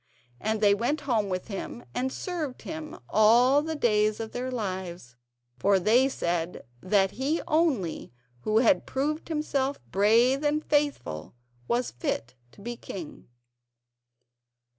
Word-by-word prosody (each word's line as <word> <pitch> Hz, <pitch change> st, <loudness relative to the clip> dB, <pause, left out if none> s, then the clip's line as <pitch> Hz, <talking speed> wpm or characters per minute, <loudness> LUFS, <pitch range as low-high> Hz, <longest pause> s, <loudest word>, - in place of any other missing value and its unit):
And 220 Hz, 0 st, -1 dB
they 205 Hz, -1 st, +6 dB
went 245 Hz, +8 st, 0 dB
home 230 Hz, -8 st, 0 dB
with 185 Hz, -1 st, -3 dB
him 220 Hz, +3 st, -6 dB
and 260 Hz, +1 st, -1 dB
served 315 Hz, -7 st, -4 dB
him 320 Hz, 0 st, -6 dB
all 240 Hz, +6 st, +5 dB
the 320 Hz, +1 st, -3 dB
days 215 Hz, -5 st, +2 dB
of 225 Hz, -1 st, -5 dB
their 250 Hz, +1 st, -3 dB
lives, 185 Hz, -, -5 dB, 0.4 s
for 200 Hz, 0 st, +4 dB
they 235 Hz, +8 st, +4 dB
said 170 Hz, -7 st, -2 dB, 0.2 s
that 195 Hz, 0 st, +2 dB
he 285 Hz, +6 st, -1 dB
only 285 Hz, -, 0 dB, 0.3 s
who 215 Hz, -, 0 dB
had 255 Hz, +5 st, +4 dB
proved 300 Hz, +4 st, -2 dB
himself 285 Hz, -3 st, -1 dB
brave 230 Hz, +7 st, +4 dB
and 300 Hz, +1 st, +1 dB
faithful 285 Hz, -, -1 dB, 0.3 s
was 245 Hz, +1 st, 0 dB
fit 120 Hz, 0 st, -3 dB, 0.2 s
to -, -, -16 dB
be 240 Hz, +3 st, -5 dB
king. 180 Hz, -8 st, -9 dB
235 Hz, 135 wpm, -27 LUFS, 200-285 Hz, 0.4 s, they